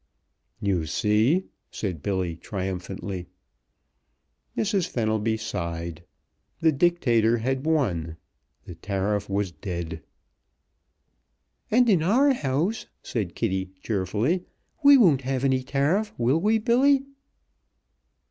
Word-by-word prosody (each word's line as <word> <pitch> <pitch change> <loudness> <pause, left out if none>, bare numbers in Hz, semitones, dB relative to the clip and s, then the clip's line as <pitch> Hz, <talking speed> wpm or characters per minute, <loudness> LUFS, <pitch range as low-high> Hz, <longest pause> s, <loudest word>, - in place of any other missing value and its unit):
"You 90 -6 0
see!" 110 - +2 0.2
said 90 -8 -4
Billy, 95 -2 -1
triumphantly. 95 0 -5 1.3
Mrs. 200 -4 +1
Fenelby 110 -3 0
sighed. 85 -6 -5 0.6
The 160 - +4
Dictator 125 -8 +2
had 130 +5 -2
won. 85 - 0 0.5
The 90 - -8
tariff 100 +4 -2
was 100 -1 -1
dead. 85 -3 -5 1.7
"And 245 +3 +4
in 190 -8 +4
our 255 - +4
house," 165 - -1 0.2
said 100 -8 -3
Kitty, 95 0 -2
cheerfully, 110 - -1 0.4
"we 280 0 +9
won't 165 - +5
have 130 0 -2
any 130 -1 +2
tariff, 145 +11 0
will 125 +6 +2
we, 215 +3 +3
Billy?" 265 +5 +3
115 Hz, 100 wpm, -25 LUFS, -, 1.7 s, we